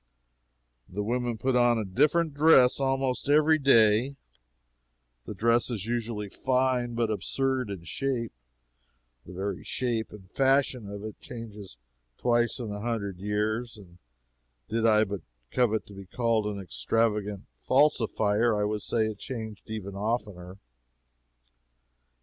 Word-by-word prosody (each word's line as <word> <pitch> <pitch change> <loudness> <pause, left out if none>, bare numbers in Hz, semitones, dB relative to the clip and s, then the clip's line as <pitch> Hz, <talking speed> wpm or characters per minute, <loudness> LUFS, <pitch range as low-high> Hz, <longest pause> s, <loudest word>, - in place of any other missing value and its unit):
The 105 +3 -3
women 120 +1 -1
put 130 +3 0
on 120 -1 +4
a 110 - -2
different 150 - +2
dress 145 -4 +5
almost 135 0 0
every 155 +2 +5
day; 120 -1 +4 1.1
the 105 - -7
dress 115 +5 +2
is 110 -5 -4
usually 115 -3 -3
fine, 125 +1 0
but 115 -2 0
absurd 130 +2 -1
in 95 -4 -6
shape; 120 +5 -2 1.0
the 90 - -9
very 95 +1 -4
shape 120 -3 -2
and 100 -3 -12
fashion 135 -5 +1
of 100 0 -7
it 110 0 -8
changes 105 - -9 0.4
twice 120 -1 +1
in 115 -5 -5
a 105 0 -5
hundred 105 -5 -3
years; 110 +4 -2
and 90 -4 -16 0.7
did 115 +1 +1
I 110 -1 +5
but 100 -3 -4 0.3
covet 110 -3 +1
to 100 - -13
be 100 -1 -10
called 115 0 0
an 105 -1 -4
extravagant 105 +1 -1 0.2
falsifier, 115 -5 +2
I - - +1
would 105 0 -1
say 110 -1 0
it 110 -2 -5
changed 110 -4 -7
even 105 -3 -5
oftener. 100 -3 -4
115 Hz, 135 wpm, -28 LUFS, 105-125 Hz, 1.1 s, dress